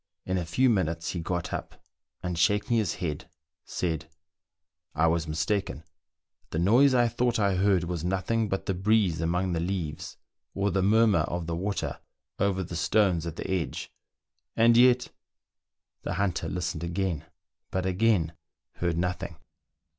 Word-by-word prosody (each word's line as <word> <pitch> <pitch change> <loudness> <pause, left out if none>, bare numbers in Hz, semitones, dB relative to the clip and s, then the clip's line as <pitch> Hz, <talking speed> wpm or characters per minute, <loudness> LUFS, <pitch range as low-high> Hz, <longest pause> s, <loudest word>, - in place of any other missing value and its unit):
In 95 0 0
a 85 - -4
few 125 +10 +3
minutes 85 -7 0
he 90 - -3
got 85 +1 -3
up, - - -5 0.5
and 90 -1 -2
shaking 105 +7 +2
his 105 -7 0
head, 80 0 -4 0.3
said, 80 -3 -3 0.3
— 85 0 -62
" 85 +2 -47
I 80 +2 +3
was 80 0 +1
mistaken; 80 +2 -1 0.7
the - - -3
noise 120 +10 +5
I 120 -1 +4
thought 120 +1 0
I 100 -2 +2
heard 95 -1 +2
was 85 -2 -3
nothing 95 +5 0
but 95 - -2
the 95 - 0
breeze 95 -3 +2
among 90 +2 0
the 85 - 0
leaves 85 -3 -4 0.4
or 100 0 +1
the 95 - +1
murmur 110 -1 +4
of 85 +2 -2
the 85 0 -2
water 100 +4 -3 0.4
over 95 -1 +1
the 85 - -7
stones 85 0 +2
at 80 - -5
the - - -5
edge; 95 -5 -3 0.6
and 115 +1 +5
yet 125 +1 +5 0.5
" - - -62
The - - -3
hunter 90 -3 -1
listened 90 0 -3
again, 85 -2 -2 0.4
but 95 0 -2
again 95 -3 +2 0.4
heard 85 -2 -1
nothing. 90 0 -2
90 Hz, 160 wpm, -28 LUFS, 85-100 Hz, 0.7 s, noise